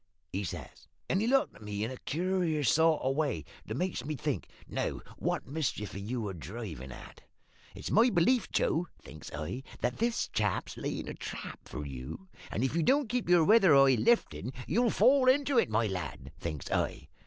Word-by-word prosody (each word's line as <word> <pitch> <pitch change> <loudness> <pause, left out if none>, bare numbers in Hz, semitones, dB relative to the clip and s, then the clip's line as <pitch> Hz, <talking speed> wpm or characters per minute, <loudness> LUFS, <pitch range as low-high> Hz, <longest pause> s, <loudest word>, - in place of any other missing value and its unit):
he 100 +2 -1
says; 95 - -7 0.2
and 185 - +1
he 225 - +1
looked 270 +2 +3
at - - -15
me 105 0 -3
in 115 - -2
a - - -5
curious 165 -4 0
sort 160 0 +4
of 135 +1 +1
way 140 - -1 0.2
that - - -3
makes 180 -8 -1
me 150 +3 -3
think, 130 - -2 0.2
`Now, - - -2 0.2
what - - -1
the - - -13
mischief 140 -9 -2
are 100 - -5
you 110 +2 -3
a 95 - -4
drivin' 80 - -7
at? - - -11 0.5
It's - - -5
my 230 +4 +6
belief, 210 +4 +2
Joe,' 170 +3 +1
thinks - - -11
I, 85 +11 -4 0.2
`that 125 +1 0
this 235 +1 0
chap's 105 -2 -1
layin' - - -4
a - - -4
trap - - -7
for 75 - -6
you; 70 - -7 0.2
and 110 - -2
if 135 +3 0
you 170 - +2
don't 270 - +3
keep 245 -4 -1
your 175 -2 +6
weather 195 -5 +6
eye 135 -1 +7
liftin', 125 - +1
you'll 240 +1 +2
fall 255 +5 +5
into 275 -1 +4
it, - - +2
my 110 +1 +2
lad,' 95 -4 -4
thinks 75 -4 -5
I. - - -1
145 Hz, 200 wpm, -31 LUFS, -, 0.5 s, eye